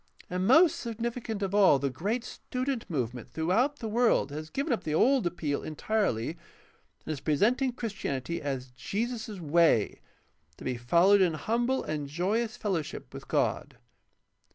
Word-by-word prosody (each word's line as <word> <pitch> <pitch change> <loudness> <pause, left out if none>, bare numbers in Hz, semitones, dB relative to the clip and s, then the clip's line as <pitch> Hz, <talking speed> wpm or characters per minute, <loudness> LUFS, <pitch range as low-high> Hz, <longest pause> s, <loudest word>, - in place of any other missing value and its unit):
And 185 +1 0
most 320 +6 +6
significant 230 -2 -4
of 195 0 -2
all 195 -8 +6
the 135 0 -1
great 210 - -2
Student 255 -1 -4
Movement 125 -6 -3
throughout 220 - +1
the 225 - -5
world 230 -8 +2
has 155 +2 -6
given 275 - -1
up 215 - -2
the 155 -2 -1
old 255 +2 +4
appeal 155 -4 -2
entirely 155 - -1 0.8
and - - -3
is 145 - -6
presenting 230 - +2
Christianity 170 - -4
as 135 -3 -4
Jesus' 220 - -4
Way, 160 - +3 0.6
to - - -11
be 130 - -1
followed 170 +12 +4
in 175 -4 +3
humble 235 - 0
and 150 -2 -3
joyous 205 +9 -1
fellowship 180 -8 -3
with - - -9
God. - - -1
190 Hz, 150 wpm, -29 LUFS, 150-235 Hz, 0.8 s, most